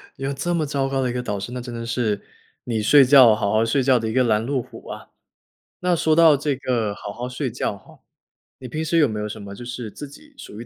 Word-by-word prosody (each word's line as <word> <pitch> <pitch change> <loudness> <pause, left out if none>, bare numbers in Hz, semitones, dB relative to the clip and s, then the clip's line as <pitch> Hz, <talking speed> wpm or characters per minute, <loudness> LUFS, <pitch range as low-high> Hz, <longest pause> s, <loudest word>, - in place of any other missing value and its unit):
有 135 +1 -3
这 175 +6 -2
么 165 -3 0
糟 140 -2 -1
糕 135 0 -1
的 130 - 0
一 - - -3
个 125 - -2
导 105 -5 -4
师， 100 +5 -6
那 125 0 -5
真 120 0 -8
的 115 0 -5
是， 115 -4 -1 0.4
你 115 -3 -2
睡 135 +6 +6
觉 130 -4 +7
好 100 -2 -1
好 110 +2 +2
睡 135 +5 +1
觉 130 -1 +4
的 110 - -3
一 - - -4
个 130 +1 +3
拦 110 -2 +1
路 135 0 -1
虎 - - -13
啊。 - - -9 0.7
那 180 -1 +2
说 160 -1 +2
到 165 -2 +6
这 145 0 -1
个 120 -6 -1
好 100 - -8
好 125 +3 -5
睡 130 +1 -3
觉 110 -3 -3
哈， 95 - -19 0.6
你 130 - -8
平 155 +6 -4
时 160 +2 0
有 155 -3 +5
没 110 -3 -4
有 105 - -3
什 110 0 -8
么 100 0 -9
就 120 - -10
是 120 -2 -6
自 145 - -8
己 295 - -17
属 105 - -10
于 - - -9
125 Hz, 295 characters per minute, -22 LUFS, 110-140 Hz, 0.7 s, 觉